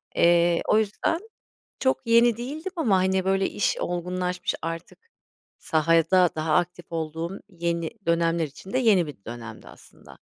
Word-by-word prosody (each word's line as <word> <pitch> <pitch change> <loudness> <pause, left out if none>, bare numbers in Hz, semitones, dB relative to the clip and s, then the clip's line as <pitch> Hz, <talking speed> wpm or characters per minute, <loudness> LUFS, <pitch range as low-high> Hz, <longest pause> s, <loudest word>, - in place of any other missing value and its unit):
Eee, 170 0 +4
o - - +4
yüzden, 220 +9 0 0.6
çok 260 -2 0
yeni 235 0 +5
değildim 300 +9 -5
ama, 240 - +2
hani, 190 0 +1
böyle, 195 0 +1
iş 205 - 0
olgunlaşmış, 180 +1 -2
artık 165 - -7 0.5
sahada 165 +3 +3
daha 155 0 0
aktif 175 +1 -1
olduğum, 165 +3 -4
yeni 170 -2 -2 0.2
dönemler 170 0 +2
için 150 - -12
de - - +2
yeni 200 -9 +4
bir 115 -9 -11
dönemdi 115 -1 -9
aslında. - - -16
175 Hz, 140 wpm, -25 LUFS, 165-200 Hz, 0.6 s, yeni